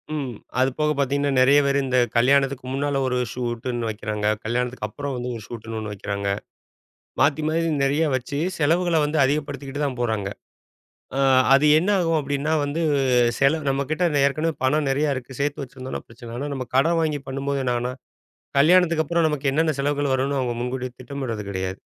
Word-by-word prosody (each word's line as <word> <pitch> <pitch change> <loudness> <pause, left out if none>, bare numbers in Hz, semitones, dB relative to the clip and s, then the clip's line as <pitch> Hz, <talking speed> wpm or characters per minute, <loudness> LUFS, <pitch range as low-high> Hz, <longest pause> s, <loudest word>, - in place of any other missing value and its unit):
ம். 135 -5 -4 0.2
அது 130 - +4
போகப் 150 -1 +1
பாத்தீங்கன்னா, 140 +1 +1
நெறைய 140 +3 +6
பேரு 140 0 +2
இந்த 130 -1 +1 0.2
கல்யாணத்துக்கு 135 +1 +3
முன்னால 145 0 0
ஒரு 125 -1 0 0.2
ஷூட்ன்னு 120 -1 -3
வைக்கிறாங்க. 105 -1 -3 0.2
கல்யாணத்துக்கு 120 -1 -2
அப்பறம் 140 +4 -5
வந்து 125 +1 -4
ஒரு 110 - -8
ஷூட்ன்னு 115 -1 -7
ஒண்ணு 105 -1 -5
வைக்கிறாங்க. 100 0 -3 0.9
மாத்தி 155 +1 +3
மாத்தி 165 +1 +1
நெறைய 145 +4 +2
வச்சு 130 +3 -4 0.2
செலவுகளை 170 +3 +2
வந்து 150 +1 -1
அதிகப்படுத்திக்கிட்டு 145 0 -3
தான் 130 -3 -3
போறாங்க. 110 -4 -1 0.9
அ - - 0 0.4
அது 140 +2 +5
என்ன 185 +5 0
ஆகும் 165 -2 +2
அப்படின்னா, 145 +2 -2
வந்து 145 +4 -2 0.6
செலவு 145 +1 +2
நம்ம 135 +1 0
கிட்ட 175 +3 0 0.2
ஏற்கனவே 155 +3 0
பணம் 145 +3 +2
நெறைய 145 +1 +1
இருக்கு. 130 0 -8
சேர்த்து 145 0 -1
வச்சிருந்தோம்னா 130 0 -7
பிரச்சனை 115 +1 -12
இல்ல. 120 - -6
ஆனா, 145 0 -3
நம்ம 130 -2 -4
கடன் 165 +5 +3
வாங்கி 150 -3 -1
பண்ணும் 135 +1 -4
போது 140 -1 0
என்ன 125 -1 +1
ஆகும்னா, 125 +1 -2 0.7
கல்யாணத்துக்கு 170 +1 +5
அப்பறம் 170 +1 +2
நமக்கு 145 -2 -1
என்னென்ன 155 +3 +2
செலவுகள் 145 0 0
வரும்னு 135 +2 0
அவுங்க 120 -2 -2
முன்கூட்டித் 125 0 -4
திட்டமிடறது 125 -5 -5
கிடையாது. 95 -1 -2
140 Hz, 175 wpm, -23 LUFS, 125-150 Hz, 0.9 s, நெறைய